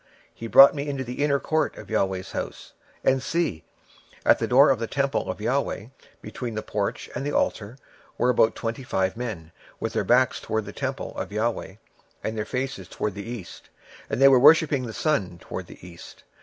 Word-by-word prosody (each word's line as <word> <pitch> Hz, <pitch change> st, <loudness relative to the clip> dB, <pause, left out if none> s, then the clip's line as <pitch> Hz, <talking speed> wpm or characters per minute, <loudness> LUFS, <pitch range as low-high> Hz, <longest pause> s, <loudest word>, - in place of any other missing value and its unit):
26:008:016 -, -, -33 dB
And -, -, -29 dB
he 115 Hz, -, -6 dB
brought 135 Hz, +4 st, +9 dB
me 145 Hz, 0 st, -4 dB
into 135 Hz, -2 st, -3 dB
the 125 Hz, +3 st, -3 dB
inner 140 Hz, -1 st, +2 dB
court 155 Hz, +2 st, -1 dB
of -, -, -9 dB
the 110 Hz, -, -4 dB
LORD's 95 Hz, -2 st, -1 dB
house, -, -, -6 dB, 0.3 s
and, 130 Hz, 0 st, +2 dB
behold, 165 Hz, -, 0 dB, 0.6 s
at -, -, +5 dB
the -, -, -1 dB
door 135 Hz, +3 st, +6 dB
of 130 Hz, -, 0 dB
the 115 Hz, -, -2 dB
temple 140 Hz, +2 st, -1 dB
of -, -, -3 dB
the 105 Hz, -, -4 dB
LORD, 130 Hz, -3 st, -2 dB, 0.3 s
between 120 Hz, -3 st, -6 dB
the 110 Hz, -, -3 dB
porch 105 Hz, -1 st, -3 dB
and 125 Hz, -, -4 dB
the 145 Hz, -, -2 dB
altar, 110 Hz, -1 st, -1 dB, 0.4 s
were 125 Hz, -, +3 dB
about 115 Hz, -2 st, +3 dB
five -, -, -8 dB
and 130 Hz, -2 st, -11 dB
twenty 95 Hz, -1 st, 0 dB
men, 110 Hz, -10 st, -6 dB, 0.3 s
with -, -, -3 dB
their -, -, 0 dB
backs 125 Hz, +1 st, +3 dB
toward 110 Hz, -1 st, -2 dB
the 100 Hz, -, -8 dB
temple -, -, -4 dB
of -, -, -4 dB
the 105 Hz, -, -6 dB
LORD, 110 Hz, -4 st, -2 dB, 0.5 s
and 110 Hz, -, -3 dB
their 110 Hz, -1 st, -2 dB
faces 125 Hz, -7 st, -4 dB
toward 105 Hz, +1 st, -3 dB
the 100 Hz, +3 st, -7 dB
east; 115 Hz, -8 st, -9 dB, 0.4 s
and -, -, -2 dB
they 135 Hz, -, +8 dB
worshipped 150 Hz, +4 st, +6 dB
the 115 Hz, -, -5 dB
sun 105 Hz, -, -1 dB
toward -, -, -7 dB
the 90 Hz, -, -13 dB
east. 85 Hz, -1 st, -13 dB
120 Hz, 215 wpm, -25 LUFS, 105-135 Hz, 0.6 s, brought